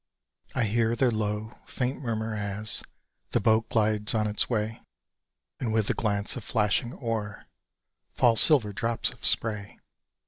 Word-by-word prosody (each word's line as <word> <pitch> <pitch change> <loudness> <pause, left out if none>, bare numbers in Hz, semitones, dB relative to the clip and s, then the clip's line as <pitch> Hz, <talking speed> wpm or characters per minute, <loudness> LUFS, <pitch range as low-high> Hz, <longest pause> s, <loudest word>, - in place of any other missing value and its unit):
I 125 - +1
hear 115 +1 +1
their 125 +1 +2
low, 110 0 -3 0.2
faint 130 +2 -3
murmur 110 -3 -3
as 105 0 -2 0.5
The - - +3
boat 110 0 +2
glides 105 -1 +1
on 110 -1 +1
its 105 0 +2
way, 110 -1 -2 0.8
And 120 -4 -2
with 110 -1 +1
the - - +2
glance 100 -2 -1
of 125 - -7
flashing 110 +2 0
oar 110 -4 -5 0.7
Fall 120 -2 +4
silver 115 -4 +7
drops 115 +1 -1
of 125 - -18
spray! 105 -3 -1
110 Hz, 145 wpm, -27 LUFS, 105-115 Hz, 0.8 s, silver